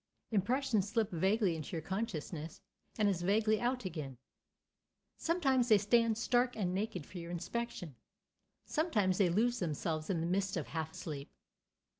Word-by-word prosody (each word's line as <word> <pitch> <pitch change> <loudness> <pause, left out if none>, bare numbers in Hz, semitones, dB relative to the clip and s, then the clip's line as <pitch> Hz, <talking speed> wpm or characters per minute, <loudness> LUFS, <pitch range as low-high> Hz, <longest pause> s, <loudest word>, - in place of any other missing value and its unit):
Impressions 220 0 +1
slip 220 -1 +1
vaguely 190 +1 +2
into 155 +1 -6
your 165 - -2
consciousness 170 -5 -4 0.4
and 215 -2 +3
as 190 -4 +1
vaguely 215 +3 +2
out 245 -2 0
again. 150 -8 -5 1.0
Sometimes 270 -8 +2
they 215 - +8
stand 225 +2 +3
stark 245 +1 +2
and 185 -4 0
naked 190 -5 -2
for 180 - -8
your 170 0 -7
inspection; 175 - -4 0.7
sometimes 215 - +1
they 190 -3 +5
lose 235 +7 +2
themselves 155 -1 -2
in 180 -4 +1
the 165 - -1
mist 190 +2 0
of 160 - -4
half 160 -1 -4
sleep. 145 -3 -6
195 Hz, 150 wpm, -34 LUFS, 170-230 Hz, 1.0 s, they